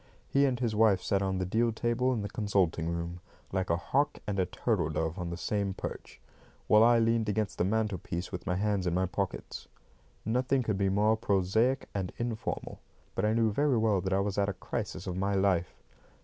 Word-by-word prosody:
He 140 0 +3
and 125 -3 -1
his 115 -4 0
wife 105 -3 +4
sat 100 -1 +1
on 95 -1 0
the 95 - -1
deal 115 +5 +1
table 120 +3 0
in 115 -5 -1
the - - -2
consulting 95 -6 0
room, 85 +1 -4 0.3
like 95 -1 -1
a 85 - +2
hawk 140 +11 0
and 100 -2 -2
a 90 - +2
turtle 90 -4 0
dove 80 +3 -2
on 85 -1 -3
the 85 - -4
same 100 0 -1
perch, - - -7 0.5
while 105 +1 +6
I 120 0 +6
leaned 115 -1 +2
against 105 0 -1
the - - +3
mantelpiece 95 -4 -2
with - - -6
my 90 - +1
hands 100 -1 0
in 85 - 0
my 95 +1 +2
pockets. 95 +1 -4 0.6
Nothing 125 +4 +1
could 105 -4 -1
be 100 -1 +2
more 105 +3 +3
prosaic 110 +4 +1
and 95 -2 -2
informal; 120 -2 -4 0.3
but - - 0
I 110 - +2
knew 115 -1 +2
very 140 +3 +2
well 110 -4 +2
that 95 - -3
I 95 +1 +2
was 100 0 -1
at 100 0 +2
a - - -2
crisis 95 -1 -5
of 90 -2 -3
my 100 +1 0
life. 95 -3 +1
100 Hz, 210 wpm, -30 LUFS, 95-110 Hz, 0.6 s, while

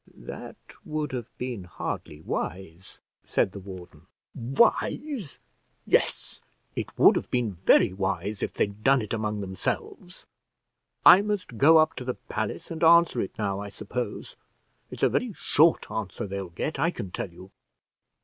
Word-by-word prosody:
"That - - -9 0.3
would 150 -1 -3
have 120 -3 -4
been 120 -7 -5
hardly 75 -3 -6
wise," 90 +2 -5 0.3
said - - +1
the 100 - -8
warden. 95 -2 -11 0.3
"Wise; 215 - 0 0.5
yes, - - +1 0.3
it - - -5
would - - +7
have - - -2
been 120 -4 0
very 90 +1 +4
wise 95 +1 -2
if - - -1
they'd 100 +1 -2
done 135 -3 +4
it 105 - -5
among 105 -2 -2
themselves. 95 -2 -4 0.8
I 185 - +10
must 205 - -3
go 160 +3 +7
up 155 0 +4
to 130 - -4
the 125 0 -3
palace 110 - -5
and 165 0 -4
answer 170 -5 +6
it 95 - -5
now, 100 -2 -1
I 100 0 -6
suppose. 105 +2 -5 0.5
It's - - -7
a - - +6
very 245 -4 -1
short 160 -1 +2
answer 110 +1 -4
they'll 100 -2 -5
get, 135 - -4
I 165 +4 +3
can 100 - -6
tell 95 - -4
you." 95 +3 -14
110 Hz, 155 wpm, -27 LUFS, 95-150 Hz, 0.8 s, I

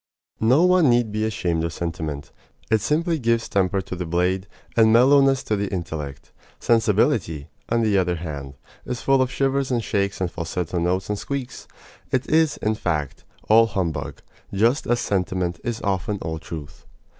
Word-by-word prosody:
No 125 +9 +4
one 180 -5 +5
need 120 -2 +2
be 110 +1 -1
ashamed 90 -6 -1
of 85 - -2
sentiment. 80 -5 -5 0.4
It 110 -1 +3
simply 165 - 0
gives 115 -2 +1
temper 95 0 +1
to 95 - -7
the 90 -1 -4
blade, 90 +3 0 0.3
and 110 -1 +5
mellowness 135 +3 +5
to 110 - 0
the 100 -1 -2
intellect. 80 -6 -5 0.3
Sensibility, 110 - +1 0.2
on 115 0 +2
the 105 -3 +3
other 90 -1 0
hand, 70 -5 -6 0.3
is 125 -2 -5
full 135 -1 +4
of 130 - +1
shivers 135 0 0
and 120 -3 0
shakes 100 -2 -1
and 90 -2 -1
falsetto 85 +1 -3
notes 90 +2 0
and 105 -1 -2
squeaks. 135 -1 -5 0.4
It 130 0 0
is, 160 -1 +3
in 110 - 0
fact, 80 -9 -3 0.2
all 115 +1 +6
humbug, 95 -6 -3 0.3
just 115 +8 +1
as 120 0 +2
sentiment 90 -5 -1
is 120 -2 -4
often 100 +1 -1
all 80 -1 -4
truth. 80 -3 -9
100 Hz, 170 wpm, -23 LUFS, 85-120 Hz, 0.4 s, all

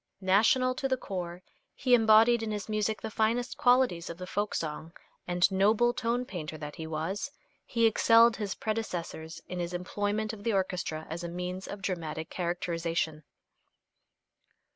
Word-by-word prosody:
National 255 +7 +4
to 270 +1 -2
the 260 -1 +1
core, 180 -4 -5 0.3
he 255 -2 +1
embodied 225 0 +6
in 225 - -3
his 210 -2 -4
music 215 0 -1
the 220 - -5
finest 230 +4 0
qualities 245 -9 +3
of 170 - -6
the 185 - -6
folk 205 +3 -2
song, 160 +1 -4 0.3
and 175 +2 +3
noble 215 +5 +3
tone 245 0 -1
painter 160 -7 -6
that 150 -1 -7
he 160 - -5
was 160 - -3 0.4
he 230 -1 +2
excelled 230 +1 +5
his 205 -3 -3
predecessors 175 -7 -4
in 180 - -5
his 175 0 -3
employment 205 +4 -2
of 205 -2 -9
the 230 - 0
orchestra 180 -5 -1
as 165 +3 -5
a 170 - -4
means 180 +2 -5
of 200 -1 -7
dramatic 160 -4 -3
characterization. 170 -3 -2
195 Hz, 160 wpm, -29 LUFS, 170-225 Hz, 0.4 s, embodied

